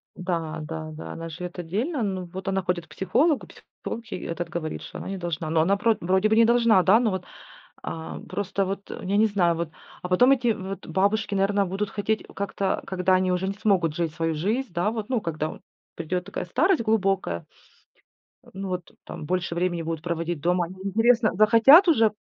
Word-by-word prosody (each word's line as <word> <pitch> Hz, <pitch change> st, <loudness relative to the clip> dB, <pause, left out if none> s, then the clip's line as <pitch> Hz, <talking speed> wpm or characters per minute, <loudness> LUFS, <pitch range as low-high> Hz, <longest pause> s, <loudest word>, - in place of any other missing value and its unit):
Да, 165 Hz, -3 st, -3 dB
да, 155 Hz, 0 st, -6 dB
да, 155 Hz, -, -8 dB
она 165 Hz, 0 st, -6 dB
живет 175 Hz, +2 st, -7 dB
отдельно. 225 Hz, -, -2 dB
Но 190 Hz, -3 st, -2 dB
вот 185 Hz, +2 st, -8 dB
она 195 Hz, 0 st, +1 dB
ходит 180 Hz, -2 st, -2 dB
к -, -, -41 dB
психологу, 250 Hz, -, +1 dB
психолог 230 Hz, 0 st, -9 dB
ей -, -, -5 dB
этот 170 Hz, 0 st, -4 dB
говорит, 165 Hz, -2 st, -4 dB
что -, -, -9 dB
она -, -, -7 dB
не 195 Hz, 0 st, -4 dB
должна. 170 Hz, -3 st, -3 dB
Но 160 Hz, 0 st, +3 dB
она 195 Hz, +5 st, +2 dB
про 225 Hz, +2 st, +2 dB
вроде 190 Hz, +4 st, +2 dB
бы 220 Hz, -, +3 dB
не 230 Hz, -, +6 dB
должна, 230 Hz, -5 st, +4 dB
да, 200 Hz, +5 st, +6 dB
но 235 Hz, -3 st, +1 dB
вот, 185 Hz, -1 st, -3 dB, 0.6 s
а, 160 Hz, 0 st, -6 dB
просто 195 Hz, +1 st, -2 dB
вот, 195 Hz, +1 st, -5 dB
я 195 Hz, +2 st, -2 dB
не 220 Hz, +1 st, +5 dB
знаю, 180 Hz, -5 st, +2 dB
вот, 170 Hz, -1 st, -3 dB, 0.3 s
а 180 Hz, -, -5 dB
потом 245 Hz, +9 st, +5 dB
эти 255 Hz, -3 st, +2 dB
вот 195 Hz, -1 st, -7 dB
бабушки, 200 Hz, +4 st, +1 dB
наверно, 200 Hz, +1 st, +2 dB
будут 195 Hz, +3 st, -3 dB
хотеть 215 Hz, +1 st, -1 dB
как-то, 200 Hz, -1 st, -1 dB
когда 185 Hz, 0 st, +1 dB
они 185 Hz, 0 st, +2 dB
уже 180 Hz, +1 st, 0 dB
не 195 Hz, -, -1 dB
смогут 190 Hz, -6 st, +1 dB
жить 165 Hz, -3 st, -1 dB
свою 165 Hz, -1 st, -1 dB
жизнь, 210 Hz, -, -2 dB
да, 175 Hz, +5 st, +1 dB
вот, 220 Hz, -1 st, -5 dB
ну, 250 Hz, -4 st, 0 dB
когда 155 Hz, -4 st, -2 dB
от -, -, -15 dB, 0.4 s
придет 180 Hz, +2 st, -3 dB
такая -, -, -4 dB
старость 320 Hz, -, +2 dB
глубокая. 195 Hz, -, 0 dB, 1.1 s
Ну 195 Hz, +1 st, -5 dB
вот 180 Hz, -2 st, -4 dB
там -, -, -7 dB
больше 175 Hz, +1 st, -1 dB
времени 175 Hz, -1 st, 0 dB
будут 165 Hz, -1 st, -4 dB
проводить 170 Hz, -1 st, -2 dB
дома. 175 Hz, +2 st, +2 dB
Они 180 Hz, +3 st, -10 dB
интересно, 225 Hz, +3 st, +3 dB
захотят 230 Hz, -, +7 dB
уже? 225 Hz, -10 st, +4 dB
190 Hz, 200 wpm, -25 LUFS, 170-215 Hz, 1.1 s, захотят